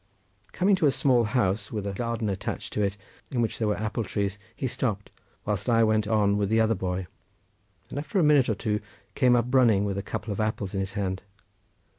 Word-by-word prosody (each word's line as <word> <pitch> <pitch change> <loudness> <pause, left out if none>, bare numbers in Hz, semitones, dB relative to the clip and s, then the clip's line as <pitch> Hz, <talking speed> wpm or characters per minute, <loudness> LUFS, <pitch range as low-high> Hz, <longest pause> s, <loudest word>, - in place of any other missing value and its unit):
Coming 195 +2 +3
to 155 - +3
a - - +6
small 125 -4 +3
house, 105 -2 0
with 105 -3 -3
a 100 - -2
garden 115 +1 -2
attached 95 -2 -4
to 105 - 0
it, 100 0 0 0.3
in 125 - -2
which 115 -2 -1
there 110 - +1
were 105 - 0
apple 110 +2 -2
trees, 100 0 -2 0.2
he - - -4
stopped, 120 -5 -2 0.3
whilst 105 +1 -1
I 115 -1 +4
went 110 -1 +2
on 105 -2 +2
with 100 -1 0
the 110 +1 +3
other 110 0 +3
boy, 95 -2 -3 0.9
and 140 - -3
after 155 +8 -3
a 180 - +4
minute 150 -4 +5
or 110 - +1
two 105 +1 -1 0.3
came 125 -3 +4
running 120 -4 +4
up - - 0
with 100 -1 -2
a - - -2
couple 105 +2 -5
of 100 - -4
apples 110 -2 -2
in 95 - -1
his 95 0 -3
hand. 95 -2 -2
110 Hz, 220 wpm, -27 LUFS, 100-120 Hz, 0.9 s, a